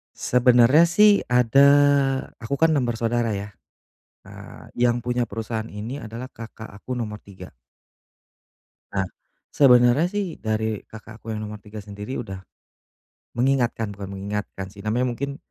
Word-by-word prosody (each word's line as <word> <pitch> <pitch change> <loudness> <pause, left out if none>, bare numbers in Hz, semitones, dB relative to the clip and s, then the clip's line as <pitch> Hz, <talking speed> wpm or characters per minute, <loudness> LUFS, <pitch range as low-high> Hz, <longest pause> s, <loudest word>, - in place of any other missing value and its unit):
Sebenarnya 125 +5 +5
sih 205 +4 +4
ada 125 +3 +4 0.7
aku 115 +4 -4
kan 165 +3 +3
6 140 -5 +1
bersaudara 115 -1 -1
ya, 100 +1 -5 0.8
nah - - -12
yang 120 0 +2
punya 120 0 -1
perusahaan 115 0 -5
ini 105 +5 -6
adalah 115 +3 -7
Kakak 115 -2 -10
aku 105 +5 -10
nomor 110 -4 -4
3. 95 -5 -13 1.4
Nah 95 -1 -1 0.4
sebenernya 125 +1 +5
sih 200 -4 -3
dari 110 -1 -2
Kakak 110 +1 -13
aku 115 - -5
yang 105 - -4
nomor 105 0 -8
3 105 0 -10
sendiri 105 +5 -7
udah 95 -4 -8 1.0
mengingatkan 120 -4 0
bukan 100 -1 -8
mengingatkan 100 0 -5
sih 100 - -11
namanya 110 +5 0
mungkin, 140 +3 -5
115 Hz, 135 wpm, -23 LUFS, 105-125 Hz, 1.4 s, Sebenarnya